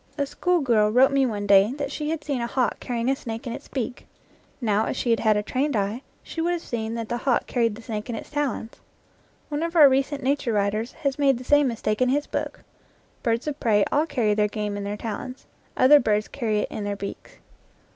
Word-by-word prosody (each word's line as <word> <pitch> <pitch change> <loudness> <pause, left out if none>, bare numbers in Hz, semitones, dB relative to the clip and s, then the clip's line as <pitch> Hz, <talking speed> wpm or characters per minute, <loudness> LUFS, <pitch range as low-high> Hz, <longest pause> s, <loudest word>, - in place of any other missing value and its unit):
A 285 - +1
schoolgirl 270 -10 +2
wrote 255 +5 +5
me 275 -1 +3
one 205 -3 -3
day 200 +3 +5
that 285 0 -4
she 300 0 -3
had 320 -1 -3
seen 275 -5 -2
a 235 - -1
hawk 250 -1 0
carrying 235 -1 -3
a 270 - +3
snake 230 -2 -7
in 235 - -4
its - - -9
beak. 255 -1 -5 0.5
Now, 215 -3 +1
if - - -3
she 240 - 0
had 230 - +3
had 215 -2 +3
a 210 - -1
trained 270 +5 -1
eye, 205 +4 -1 0.2
she 325 - -5
would 345 +2 +1
have 345 - -4
seen 225 -1 -3
that 230 -1 -4
the 240 - -2
hawk 250 0 +1
carried 230 -4 0
the 230 - -12
snake 215 -1 -5
in 235 - -2
its 225 - -8
talons. 285 -6 -2 0.8
One 295 0 -2
of 335 +1 -3
our 305 -4 +9
recent 275 +1 0
nature 270 -3 0
writers 210 +3 0
has 280 0 0
made 275 -3 +3
the 250 - -8
same 290 +2 +4
mistake 215 -2 -2
in 250 - +4
his 290 +3 +1
book. - - -4 0.6
Birds 230 -1 0
of 300 -1 -4
prey 210 -3 +3
all 300 +3 +2
carry 240 -8 +1
their 210 0 +2
game 210 -1 -3
in 205 0 -4
their 205 +1 -3
talons; 235 +4 -6 0.3
other 285 +3 +7
birds 215 -3 +1
carry 215 -5 -1
it - - -4
in 210 - -4
their 205 0 -2
beaks. 200 0 -8
240 Hz, 235 wpm, -24 LUFS, 215-280 Hz, 0.8 s, our